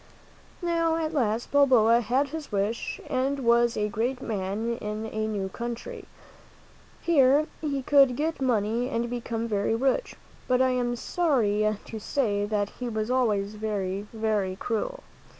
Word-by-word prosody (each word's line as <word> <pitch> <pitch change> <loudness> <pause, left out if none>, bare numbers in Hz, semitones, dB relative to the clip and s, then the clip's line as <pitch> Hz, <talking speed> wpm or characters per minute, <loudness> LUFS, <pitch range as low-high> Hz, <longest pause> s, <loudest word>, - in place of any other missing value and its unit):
Now, 335 -1 +1
at 320 -1 -2
last, 235 -5 0
Balboa 240 -5 +5
had 260 +5 +1
his 310 -2 -7
wish 205 +3 -2
and 270 +2 0
was 235 -2 +3
a 210 0 +1
great 235 +5 -1
man 220 +2 -2
in 210 0 -4
a 220 0 -2
new 205 -3 -2
country. 235 +3 -6 1.0
Here 290 -2 +4 0.2
he 280 -4 -2
could 275 -2 +5
get 315 +2 -2
money 235 0 +1
and 235 -1 -2
become 230 -1 -3
very 210 0 0
rich; 270 - 0 0.3
but 255 0 +3
I 260 0 +4
am 245 -1 0
sorry 215 - +1
to 220 - -7
say 205 -3 0
that 205 -1 -1
he 250 -1 -3
was 215 +1 -2
always 210 -5 +1
very, 205 -2 -3
very 215 -4 -1
cruel. 235 - -3
235 Hz, 150 wpm, -27 LUFS, 215-265 Hz, 1.0 s, Balboa